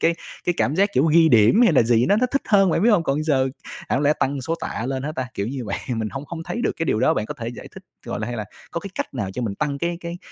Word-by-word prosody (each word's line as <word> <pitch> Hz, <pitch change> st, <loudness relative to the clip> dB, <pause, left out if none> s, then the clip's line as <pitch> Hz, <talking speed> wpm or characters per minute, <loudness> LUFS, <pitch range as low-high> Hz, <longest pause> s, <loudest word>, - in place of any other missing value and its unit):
cái 165 Hz, 0 st, +3 dB, 0.3 s
cái 175 Hz, -, +1 dB
cảm 145 Hz, -, +1 dB
giác, 200 Hz, +2 st, +4 dB
kiểu, 135 Hz, -, +3 dB
ghi 160 Hz, +1 st, +5 dB
điểm 115 Hz, -, +5 dB
hay 175 Hz, -, +4 dB
là 135 Hz, -, +5 dB
gì 120 Hz, +1 st, +3 dB
nó 205 Hz, -, +4 dB
nó 250 Hz, +3 st, +2 dB
thích 275 Hz, -, +1 dB
hơn, 195 Hz, -4 st, +5 dB
bạn -, -, +1 dB
biết 235 Hz, -, +5 dB
hông? 190 Hz, -6 st, +4 dB
Còn 145 Hz, 0 st, 0 dB
giờ 135 Hz, -4 st, +2 dB, 0.4 s
chẳng -, -, +1 dB
lẽ 145 Hz, +1 st, +4 dB
tăng 135 Hz, 0 st, 0 dB
số 165 Hz, +6 st, -2 dB
tạ 120 Hz, -7 st, -4 dB
lên 130 Hz, 0 st, -2 dB
hả 150 Hz, +2 st, -3 dB
ta, 130 Hz, -5 st, -4 dB
kiểu 100 Hz, -, -2 dB
như 130 Hz, -2 st, -4 dB
vậy, -, -, -3 dB, 0.2 s
mình 110 Hz, -1 st, -2 dB
hông 135 Hz, +4 st, -6 dB
hông 165 Hz, -1 st, -6 dB
thấy 240 Hz, -, -4 dB
được -, -, +1 dB
cái 165 Hz, -, -2 dB
điều 110 Hz, -, +1 dB
đó -, -, +3 dB
bạn 105 Hz, -, -2 dB
có -, -, -5 dB
thể 115 Hz, -1 st, -5 dB
giải 120 Hz, -, -9 dB
thích, -, -, -10 dB, 0.2 s
gọi -, -, -4 dB
là, 105 Hz, -, -2 dB
hay 120 Hz, -, -4 dB
là 110 Hz, -, -3 dB, 0.3 s
có 170 Hz, -, -3 dB
cái 200 Hz, -, -8 dB
cách -, -, -4 dB
nào 100 Hz, -7 st, -3 dB
cho 125 Hz, +5 st, -4 dB
mình 100 Hz, -4 st, -2 dB
tăng 145 Hz, +1 st, -2 dB
cái 170 Hz, +2 st, -1 dB
cái 170 Hz, 0 st, -6 dB
140 Hz, 325 wpm, -22 LUFS, 120-170 Hz, 0.4 s, ghi